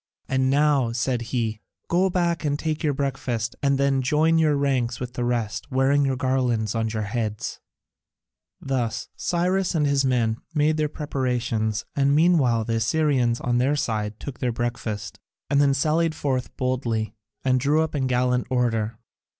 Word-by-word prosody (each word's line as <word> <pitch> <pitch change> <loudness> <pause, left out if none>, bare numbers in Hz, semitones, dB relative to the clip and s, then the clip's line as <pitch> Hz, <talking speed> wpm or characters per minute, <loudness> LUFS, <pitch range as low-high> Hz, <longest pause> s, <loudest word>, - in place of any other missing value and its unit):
And 130 0 +1
now," 140 -3 +3
said 125 0 0
he, 110 -3 -2 0.3
"go 185 +3 +2
back 170 -3 0
and 145 -1 0
take 155 0 -2
your 145 -3 +1
breakfast, 130 -4 -2
and 140 -1 +2
then 135 -1 +2
join 155 +5 +3
your 155 -2 +3
ranks 130 -4 0
with 125 -1 -5
the 120 - -2
rest, 120 -2 -2
wearing 135 +2 +3
your 135 -1 +1
garlands 125 -5 0
on 115 -1 -1
your 110 -1 -2
heads." 105 0 -3 1.0
Thus 120 -4 -2
Cyrus 180 +1 0
and 150 -2 +2
his 140 -1 +2
men 120 -4 +1 0.2
made 155 +1 +2
their 150 -1 0
preparations, 120 -7 -2
and 140 0 +3
meanwhile 150 -9 +3
the 115 0 0
Assyrians 125 -1 +1
on 120 0 +1
their 135 +4 +2
side 110 -6 -2
took 140 -4 -7
their 125 - 0
breakfast, 115 -3 -4 0.3
and 140 0 +4
then 140 -1 +3
sallied 160 +3 +1
forth 130 -4 -2
boldly 120 -4 -1 0.3
and 130 -1 +3
drew 150 +4 +2
up 160 - -4
in 135 -3 0
gallant 125 0 +1
order. 115 -3 0
130 Hz, 165 wpm, -24 LUFS, 120-145 Hz, 1.0 s, and